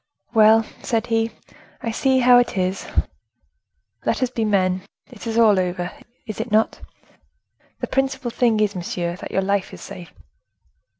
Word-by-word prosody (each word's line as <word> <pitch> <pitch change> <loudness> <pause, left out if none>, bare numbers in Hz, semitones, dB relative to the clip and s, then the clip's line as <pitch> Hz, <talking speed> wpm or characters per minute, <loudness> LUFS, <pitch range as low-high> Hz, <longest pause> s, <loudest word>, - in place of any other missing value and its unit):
"Well," 220 0 +6 0.2
said 230 -3 -1
he, 225 -1 +1 0.5
"I 230 - -1
see 265 +3 +2
how 245 0 +7
it 245 - 0
is. 185 +1 -1 1.2
Let - - 0
us 250 - -1
be 230 - -1
men! 185 -3 +1 0.3
It 235 -1 -9
is 225 0 -2
all 215 -4 +5
over, 180 -1 -2 0.3
is 215 -1 -4
it 235 - -5
not? 220 +1 +2 1.0
The - - 0
principal 265 -2 -1
thing 230 -2 +2
is, 210 -1 +2
monsieur, 175 -1 -3
that - - -7
your 195 - 0
life 200 0 0
is - - -13
safe." 175 -3 -9
220 Hz, 160 wpm, -22 LUFS, 190-240 Hz, 1.2 s, how